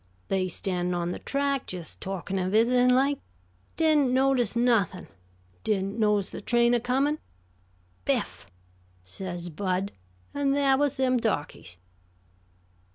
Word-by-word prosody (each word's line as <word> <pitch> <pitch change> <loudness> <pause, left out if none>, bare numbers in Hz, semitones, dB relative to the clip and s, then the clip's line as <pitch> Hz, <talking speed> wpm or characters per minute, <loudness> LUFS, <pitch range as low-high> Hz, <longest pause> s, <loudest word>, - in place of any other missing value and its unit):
They 190 -1 +1
standin' 180 -1 -2
on 175 0 -1
the - - -5
track, 280 -1 -1
jes' 175 -3 -7
talkin' 195 0 -4
and 185 0 -1
visitin' 245 +4 +4
like. 270 +3 +3 0.6
Didn't 305 -5 +3
notice 260 -3 +2
nuthin'. 230 -7 +1 0.6
Didn't 200 +1 -1
notice 210 -3 +2
the - - -7
train 240 +2 +3
a 240 - +3
comin'. 270 +5 +1 0.9
'Biff!' - - -1 0.6
says 175 - -5
Bud; 185 +3 -2 0.4
an' 280 -1 +1
thah 275 -1 +4
was 285 0 +1
them 255 -1 +2
darkies." 145 - -2
230 Hz, 125 wpm, -27 LUFS, 185-265 Hz, 0.9 s, visitin